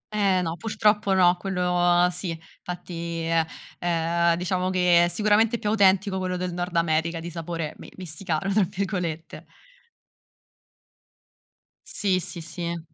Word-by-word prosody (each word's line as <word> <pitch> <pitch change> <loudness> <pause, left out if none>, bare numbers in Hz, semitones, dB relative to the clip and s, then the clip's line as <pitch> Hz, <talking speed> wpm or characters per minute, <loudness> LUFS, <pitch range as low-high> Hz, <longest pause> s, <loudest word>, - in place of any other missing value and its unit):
Eh, 195 -3 +3
no, 165 0 -2
purtroppo 210 0 +1
no, 180 -1 +5
quello 180 -1 +2
sì. 175 +1 -4 0.3
Infatti 170 -2 -5
uhm, 165 -1 +2 0.3
ehm, 170 0 +1
diciamo 180 +1 -1
che 180 -2 +4
è - - +1
sicuramente 210 +5 +2
più 215 -2 -2
autentico 195 -2 +3
quello 185 -1 -2
del 180 -1 -3
Nord 175 0 -4
America 165 0 +1
di 170 +1 -7
sapore 165 -2 -4
mi - - -10
"messicano" 185 +2 -2
tra 210 - +4
virgolette. 180 -4 -4 2.4
Sì 190 -3 0
sì 175 0 -5
sì. 170 0 -6
180 Hz, 130 wpm, -25 LUFS, 170-190 Hz, 2.4 s, no